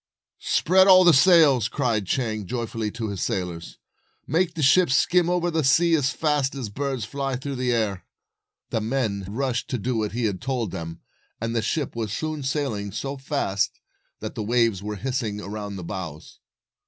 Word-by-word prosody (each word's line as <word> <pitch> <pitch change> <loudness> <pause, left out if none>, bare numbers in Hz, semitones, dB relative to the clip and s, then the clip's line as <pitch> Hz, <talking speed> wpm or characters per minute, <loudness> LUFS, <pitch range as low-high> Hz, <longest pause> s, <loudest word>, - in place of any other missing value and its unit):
"Spread 190 +3 +4
all 185 -1 +8
the 175 -2 +7
sails," 140 - +5
cried 115 -7 -1
Chang, 110 -4 -2
joyfully, 115 -2 -3
to 110 0 -4
his 100 -2 -5
sailors. 85 -3 -3 0.3
" - - -43
Make 175 0 +2
the 160 - -2
ship 175 +6 +5
skim 175 +6 +3
over 175 -1 +1
the 160 -1 0
sea 165 +5 +4
as 145 -5 +3
fast 150 -4 0
as 125 -6 -4
a - - -14
bird 135 0 -3
flies 135 +3 -3
through 135 +1 -5
the 125 0 0
air." 110 -5 -1 0.7
The 110 - 0
men 110 -4 -1
rushed 125 +2 -2
to 125 - -1
do 115 0 -1
as 105 - -4
he 120 0 -1
had 100 -4 -2
told 120 -6 -2
them, 85 -2 -7 0.4
257 115 - -3
and 115 0 -3
the 115 - +2
ship 140 +5 -2
was 110 -3 -3
soon 155 +4 -3
sailing 130 -8 -2
so 135 +7 -4
fast 135 -8 -1 0.4
that - - -5
the - - -5
waves 115 -2 +1
were 105 +1 -4
hissing 115 -2 -3
around 105 0 -6
the 95 - -6
bows. 85 -5 -7
120 Hz, 190 wpm, -24 LUFS, 105-140 Hz, 0.7 s, all